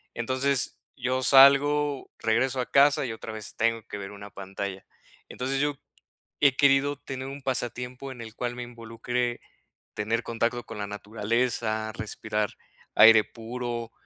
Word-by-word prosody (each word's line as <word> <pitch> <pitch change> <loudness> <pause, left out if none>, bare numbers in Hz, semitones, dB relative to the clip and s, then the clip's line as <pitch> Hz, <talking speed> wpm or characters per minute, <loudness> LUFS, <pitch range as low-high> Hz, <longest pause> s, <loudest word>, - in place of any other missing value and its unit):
Entonces, 130 +3 0 0.2
yo 130 +1 -1
salgo, 140 +1 +5
regreso 130 +4 +1
a 125 - -3
casa 140 0 +5
y 115 - -3
otra 110 0 -8
vez 110 -1 -7
tengo 115 0 0
que 100 - -6
ver 100 0 -6
una 100 0 -10
pantalla. 95 0 -6 0.4
Entonces, 135 +2 -2
yo 145 -1 0 0.6
he 140 -3 +4
querido 140 0 +4
tener 135 -1 -7
un 140 +1 -7
pasatiempo, 125 +1 -3
en 125 -3 -9
el 110 -1 -9
cual 120 0 -3
me 125 - -5
involucre, 120 +1 -3 0.5
tener 115 +3 -1
contacto 115 +1 -1
con 115 - -9
la 105 - -3
naturaleza, 110 +1 -1
respirar 105 -1 -3 0.4
aire 110 0 +8
puro, 120 0 -6
120 Hz, 145 wpm, -27 LUFS, 110-130 Hz, 0.6 s, aire